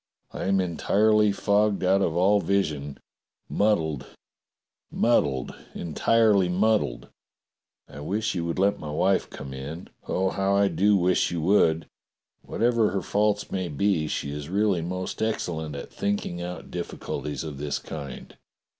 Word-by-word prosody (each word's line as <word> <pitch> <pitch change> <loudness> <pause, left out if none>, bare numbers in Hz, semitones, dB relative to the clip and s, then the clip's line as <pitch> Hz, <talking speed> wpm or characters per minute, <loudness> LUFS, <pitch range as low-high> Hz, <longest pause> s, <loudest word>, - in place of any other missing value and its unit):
"I - - -5
am 95 0 +2
entirely 105 +4 +3
fogged 100 0 +1
out 95 +2 +3
of 85 -4 0
all 100 +4 +4
vision. 75 -9 -1 0.5
Muddled, 80 -10 0 0.8
muddled 70 - +1
— - - -26
entirely 100 +3 +2
muddled. 100 - +1 0.8
I 70 - -11
wish 105 +8 -1
you 85 - -2
would 85 - -3
let 100 +2 +2
my 75 - -6
wife 95 +6 +1
come 70 0 -8
in. 70 +6 -7 0.2
Oh, 95 0 0
how 95 0 +1
I 100 0 +4
do 100 +1 +3
wish 90 0 +2
you 85 - -3
would! 80 -3 +3 0.6
\Miatever 115 -2 +1
her 95 - -1
faults 105 0 0
may 95 -2 -2
be, 80 0 0
she 70 - -3
is 75 +1 -6
really 100 -2 +1
most 90 +2 -4
excellent 80 -8 -2
at 70 - -8
thinking 100 -4 -2
out 90 0 -7
difficulties 75 +2 -4
of 75 -4 -7
this 75 -1 -2
kind. 70 -2 -8
95 Hz, 145 wpm, -26 LUFS, 80-100 Hz, 0.8 s, all